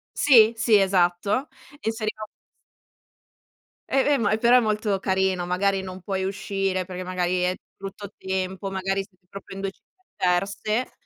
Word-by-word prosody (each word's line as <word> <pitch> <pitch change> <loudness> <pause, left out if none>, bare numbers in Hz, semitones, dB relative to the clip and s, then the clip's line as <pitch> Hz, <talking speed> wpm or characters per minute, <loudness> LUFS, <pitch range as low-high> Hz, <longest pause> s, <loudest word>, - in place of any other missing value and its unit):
Sì, 230 -5 +6
sì, 225 -2 +4
esatto 190 - +1 0.3
inseriva 220 -1 -3
un - - -18 1.6
E, 270 - +2 0.2
ehm, 275 - -1
ma 205 +1 +2
però 240 +2 +5
è - - +7
molto 215 -3 0
carino, 190 -2 0
magari 190 +2 +1
non 185 0 -8
puoi 190 0 -2
uscire 195 -1 -2
perché 185 0 -7
magari 180 0 -1
è 180 +1 +1 0.2
brutto 195 +1 -8
tempo, 190 +1 -3
magari 195 0 -1
siete 185 -2 -37
proprio 195 0 -10
in 195 - -6
2 195 - -2
città 375 - -38
diverse, 200 +6 0
195 Hz, 150 wpm, -24 LUFS, 185-215 Hz, 1.6 s, è